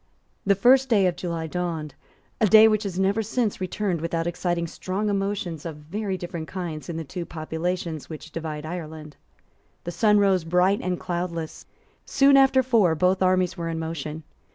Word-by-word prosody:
The 200 Hz, -, +5 dB
first 255 Hz, +5 st, +4 dB
of 190 Hz, -5 st, +3 dB
July 170 Hz, -2 st, -4 dB
dawned, 165 Hz, -3 st, -3 dB, 0.5 s
a 220 Hz, -, +4 dB
day 220 Hz, +2 st, +8 dB
which 215 Hz, -1 st, +2 dB
has 185 Hz, -3 st, -4 dB
never 195 Hz, +3 st, +2 dB
since 220 Hz, -1 st, -1 dB
returned 185 Hz, -2 st, -2 dB
without 165 Hz, 0 st, -2 dB
exciting 175 Hz, 0 st, -1 dB
strong 190 Hz, +5 st, -3 dB
emotions 195 Hz, -5 st, -2 dB
of 165 Hz, -3 st, -5 dB
very 190 Hz, +6 st, -4 dB
different 170 Hz, -3 st, -6 dB
kinds 175 Hz, -4 st, -6 dB
in 165 Hz, -, -4 dB
the 165 Hz, -, -3 dB
two 175 Hz, +4 st, -6 dB
populations 165 Hz, 0 st, -4 dB
which 160 Hz, 0 st, -9 dB
divide 155 Hz, -2 st, -5 dB
Ireland. 155 Hz, -3 st, -7 dB, 0.7 s
The 175 Hz, -, -4 dB
sun 210 Hz, +3 st, +3 dB
rose 195 Hz, -4 st, +3 dB
bright 180 Hz, +4 st, +2 dB
and 180 Hz, -1 st, -2 dB
cloudless. 170 Hz, -2 st, -4 dB, 0.4 s
Soon 275 Hz, 0 st, +4 dB
after 270 Hz, -1 st, +5 dB
four 220 Hz, -10 st, +3 dB
both 185 Hz, +4 st, +2 dB
armies 185 Hz, -1 st, +2 dB
were 165 Hz, -1 st, -3 dB
in 165 Hz, -, -3 dB
motion. 160 Hz, -1 st, -5 dB
180 Hz, 170 wpm, -25 LUFS, 165-200 Hz, 0.7 s, day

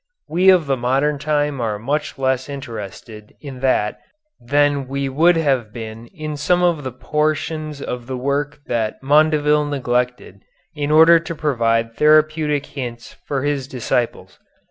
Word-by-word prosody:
We 180 Hz, +4 st, +3 dB
of 180 Hz, -4 st, +5 dB
the 135 Hz, -1 st, 0 dB
modern 135 Hz, +4 st, 0 dB
time 145 Hz, -2 st, 0 dB
are 110 Hz, -3 st, -1 dB
much 145 Hz, +8 st, -3 dB
less 130 Hz, 0 st, -1 dB
interested 110 Hz, -5 st, -8 dB
in 135 Hz, -4 st, -9 dB
that 125 Hz, -5 st, 0 dB, 0.4 s
than 145 Hz, +1 st, +1 dB
we 140 Hz, +1 st, -2 dB
would 165 Hz, +6 st, +3 dB
have 135 Hz, -9 st, 0 dB
been 115 Hz, 0 st, -8 dB
in 155 Hz, -4 st, -6 dB
some 180 Hz, +5 st, +1 dB
of 170 Hz, -4 st, +1 dB
the 130 Hz, -, -4 dB
portions 155 Hz, +2 st, -2 dB
of 125 Hz, -1 st, -5 dB
the 130 Hz, -1 st, -4 dB
work 140 Hz, +3 st, -2 dB
that 115 Hz, +1 st, -2 dB
Mondeville 150 Hz, 0 st, +3 dB
neglected 125 Hz, -6 st, -2 dB, 0.3 s
in 145 Hz, -2 st, -3 dB
order 160 Hz, +2 st, +7 dB
to 165 Hz, 0 st, -6 dB
provide 115 Hz, -6 st, 0 dB
therapeutic 155 Hz, -1 st, +3 dB
hints 120 Hz, -5 st, -7 dB
for 140 Hz, -2 st, -2 dB
his 145 Hz, -2 st, -1 dB
disciples. 120 Hz, -2 st, -3 dB
140 Hz, 145 wpm, -20 LUFS, 125-150 Hz, 0.4 s, order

